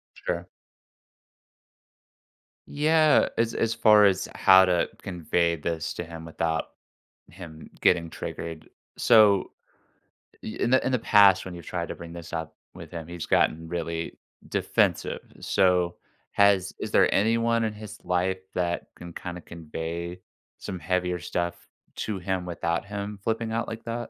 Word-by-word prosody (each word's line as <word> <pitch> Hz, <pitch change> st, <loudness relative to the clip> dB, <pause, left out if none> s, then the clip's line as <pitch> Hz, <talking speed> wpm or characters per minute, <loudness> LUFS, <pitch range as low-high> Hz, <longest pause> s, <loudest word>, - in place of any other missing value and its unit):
Sure. 85 Hz, 0 st, -4 dB, 2.2 s
Yeah, 155 Hz, +1 st, +4 dB
as 115 Hz, 0 st, +1 dB
as 115 Hz, 0 st, 0 dB
far 105 Hz, -2 st, +6 dB
as 95 Hz, -2 st, +2 dB
how 95 Hz, 0 st, +7 dB
to 90 Hz, -2 st, +1 dB
convey 85 Hz, -1 st, 0 dB
this 80 Hz, +1 st, -3 dB
to 85 Hz, -, -5 dB
him 80 Hz, -1 st, -9 dB
without 80 Hz, 0 st, -2 dB, 0.6 s
him 80 Hz, -3 st, -11 dB
getting 85 Hz, -2 st, +3 dB
triggered 80 Hz, -2 st, -7 dB, 0.3 s
so 105 Hz, -4 st, +5 dB, 0.9 s
i -, -, -6 dB
in 120 Hz, -, -2 dB
the 130 Hz, -, +4 dB
in 130 Hz, -, +1 dB
the 125 Hz, -, +1 dB
past, 100 Hz, -4 st, +6 dB
when 90 Hz, -2 st, -7 dB
you've 85 Hz, -, -10 dB
tried 85 Hz, -1 st, -3 dB
to -, -, -4 dB
bring 85 Hz, 0 st, -10 dB
this 85 Hz, -1 st, -9 dB
up 80 Hz, -1 st, -4 dB, 0.2 s
with -, -, -10 dB
him, 85 Hz, -2 st, -7 dB
he's 85 Hz, -1 st, -6 dB
gotten 80 Hz, +1 st, +1 dB
really 85 Hz, -1 st, -4 dB, 0.3 s
defensive, -, -, 0 dB, 0.2 s
so, 90 Hz, -2 st, +2 dB, 0.4 s
has 100 Hz, -2 st, +3 dB
is -, -, -5 dB
there -, -, +4 dB
anyone 115 Hz, +2 st, +2 dB
in 110 Hz, -1 st, -1 dB
his 105 Hz, 0 st, -9 dB
life 90 Hz, +1 st, 0 dB
that 85 Hz, -1 st, -2 dB
can 85 Hz, -1 st, -10 dB
kinda 90 Hz, 0 st, -7 dB
convey 85 Hz, +2 st, -6 dB, 0.4 s
some 95 Hz, -, -5 dB
heavier 90 Hz, +1 st, -1 dB
stuff 85 Hz, 0 st, -2 dB, 0.4 s
to 105 Hz, -3 st, -3 dB
him 90 Hz, 0 st, -2 dB
without 85 Hz, 0 st, -2 dB
him 100 Hz, 0 st, -6 dB
flipping 115 Hz, 0 st, -1 dB
out 115 Hz, +1 st, -1 dB
like 115 Hz, 0 st, -7 dB
that? 120 Hz, 0 st, -4 dB
90 Hz, 145 wpm, -26 LUFS, 85-105 Hz, 2.2 s, how